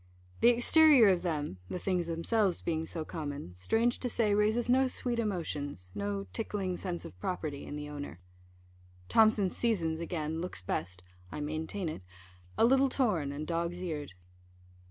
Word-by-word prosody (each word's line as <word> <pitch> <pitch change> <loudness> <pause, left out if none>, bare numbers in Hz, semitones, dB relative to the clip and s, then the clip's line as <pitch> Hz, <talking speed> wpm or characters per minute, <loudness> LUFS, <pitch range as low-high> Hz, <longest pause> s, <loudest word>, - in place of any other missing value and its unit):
The - - +5
exterior 245 0 +6
of 185 -2 +2
them 150 - -2
(the - - -3
things 180 -2 -1
themselves 180 +3 0
being 160 -1 -1
so 160 -2 -3
common), 145 - -5
strange 225 - +1
to 250 - -2
say, 215 -3 +2
raises 215 +3 +2
no 260 +2 +4
sweet 245 -2 -2
emotions, 145 - -3
no 100 0 -3
tickling 185 - -2
sense 175 -2 -4
of 90 - -11
property 155 - -3
in - - -5
the 150 0 -5
owner. 145 - -7 0.9
Thomson's 215 -4 +4
Seasons, 170 -9 0
again, 160 -1 -3
looks 175 - -4
best 90 0 -3 0.3
(I - - -5
maintain 160 +5 -3
it) 155 - -5 0.6
a - - +5
little 270 +2 +4
torn, 205 - +1
and 145 +2 -5
dog's 170 +1 -2
eared. 155 - -4
170 Hz, 155 wpm, -31 LUFS, 150-215 Hz, 0.9 s, exterior